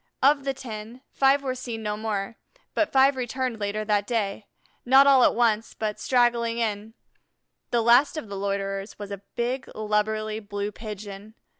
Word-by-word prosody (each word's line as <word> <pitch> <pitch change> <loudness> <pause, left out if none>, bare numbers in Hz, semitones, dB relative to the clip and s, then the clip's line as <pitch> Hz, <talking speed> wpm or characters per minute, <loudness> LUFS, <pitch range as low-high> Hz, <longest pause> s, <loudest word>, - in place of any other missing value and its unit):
Of 280 0 +4
the 275 - 0
ten, 230 -1 -8
five 275 +1 +3
were 260 -2 -1
seen 240 -3 -6
no 210 -1 -1
more, 210 0 -3 0.4
but 320 - +1
five 270 +1 +5
returned 255 -2 -3
later 210 +1 -2
that 205 -1 +1
day, 210 -3 -2 0.4
not 265 +2 +6
all 270 -3 +6
at - - +4
once, 225 -2 +1
but 215 -1 -3
straggling 240 -2 +2
in; 220 -1 -2 0.7
the 235 -1 +1
last 245 +7 +5
of 270 - -5
the 200 - -6
loiterers 195 0 -3
was 205 -1 -8
a 200 -1 -6
big, 245 +2 -2
lubberly 215 0 -1
Blue 205 -1 -4
Pigeon. 210 -1 -9
220 Hz, 165 wpm, -25 LUFS, 210-250 Hz, 0.7 s, not